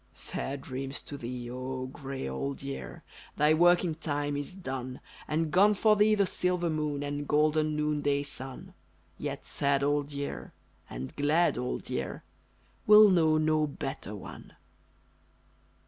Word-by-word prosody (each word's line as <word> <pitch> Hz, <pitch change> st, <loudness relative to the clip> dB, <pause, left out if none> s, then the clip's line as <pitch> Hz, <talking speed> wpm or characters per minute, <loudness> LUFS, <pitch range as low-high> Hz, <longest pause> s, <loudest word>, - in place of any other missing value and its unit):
Fair 140 Hz, +1 st, -5 dB
dreams 135 Hz, +1 st, -4 dB
to 145 Hz, -, -8 dB
thee, 125 Hz, -2 st, -5 dB
0 130 Hz, +1 st, -4 dB
grey 135 Hz, -, -5 dB
old 135 Hz, -, -4 dB
year, 140 Hz, 0 st, -6 dB, 0.3 s
Thy 150 Hz, +1 st, +5 dB
working 175 Hz, +1 st, +4 dB
time 145 Hz, -2 st, -2 dB
is 145 Hz, +5 st, -5 dB
done, 130 Hz, -7 st, -5 dB, 0.3 s
And 155 Hz, 0 st, 0 dB
gone 205 Hz, +4 st, +5 dB
for 215 Hz, +1 st, +4 dB
thee 210 Hz, +1 st, +4 dB
the 200 Hz, -1 st, +3 dB
silver 180 Hz, -2 st, 0 dB
moon, 150 Hz, -2 st, -2 dB
And 145 Hz, 0 st, -3 dB
golden 155 Hz, 0 st, +2 dB
noon 150 Hz, -1 st, 0 dB
day 140 Hz, 0 st, +1 dB
sun; 135 Hz, -2 st, -8 dB, 0.5 s
Yet -, -, -4 dB
sad 140 Hz, 0 st, +1 dB
old 145 Hz, 0 st, 0 dB
year 140 Hz, 0 st, -5 dB, 0.4 s
and 65 Hz, +2 st, -6 dB
glad 155 Hz, +4 st, +3 dB
old 125 Hz, +1 st, -3 dB
year -, -, -4 dB, 0.6 s
We'll 210 Hz, -1 st, +9 dB
know 160 Hz, -3 st, +4 dB
no 155 Hz, 0 st, +2 dB
better 135 Hz, -7 st, -5 dB
one. 100 Hz, -, -10 dB
145 Hz, 145 wpm, -29 LUFS, 135-160 Hz, 0.6 s, We'll